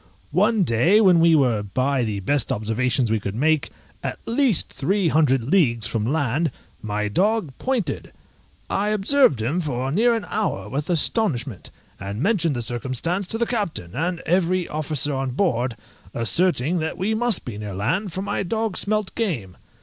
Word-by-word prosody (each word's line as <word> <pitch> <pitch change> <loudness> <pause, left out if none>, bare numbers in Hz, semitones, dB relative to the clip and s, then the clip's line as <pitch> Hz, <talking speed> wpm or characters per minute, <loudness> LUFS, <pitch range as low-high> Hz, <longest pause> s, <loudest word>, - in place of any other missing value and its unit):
One 210 +4 +3
day 165 - +4
when 185 -5 +5
we 165 0 +5
were, 125 -8 +2
by 130 +6 0
the 105 -3 -3
best 145 +8 +1
observations 115 +3 0
we 110 - +2
could 100 0 -5
make, 155 +4 +1 0.3
at - - -4
least 240 - +1
three 185 +4 +1
hundred 140 -5 +3
leagues 120 - +2
from 110 0 -1
land, 150 +1 0 0.3
my 105 0 -2
dog 195 - 0
pointed; 255 -6 -2 0.6
I 200 +2 -1
observed 210 - +3
him 150 +10 0
for 135 -4 -2
near 230 +8 +3
an 225 - -3
hour 200 - -2
with 145 +6 -3
astonishment, 145 - 0 0.3
and 100 +1 -5
mentioned 170 - +1
the 120 - -2
circumstance 130 - -2
to 225 - -1
the 235 - +1
captain 200 - -3
and 170 +5 -2
every 180 0 +1
officer 150 -1 -1
on 135 -1 -2
board, 125 - 0 0.4
asserting 165 +6 +2
that 160 0 -3
we 195 +4 0
must 235 -2 0
be 105 -4 -6
near 105 -3 -6
land, 165 - -1
for 190 +4 -4
my 205 0 -2
dog 220 +2 -2
smelt 215 -1 0
game. 125 - -3
155 Hz, 165 wpm, -23 LUFS, 120-195 Hz, 0.6 s, when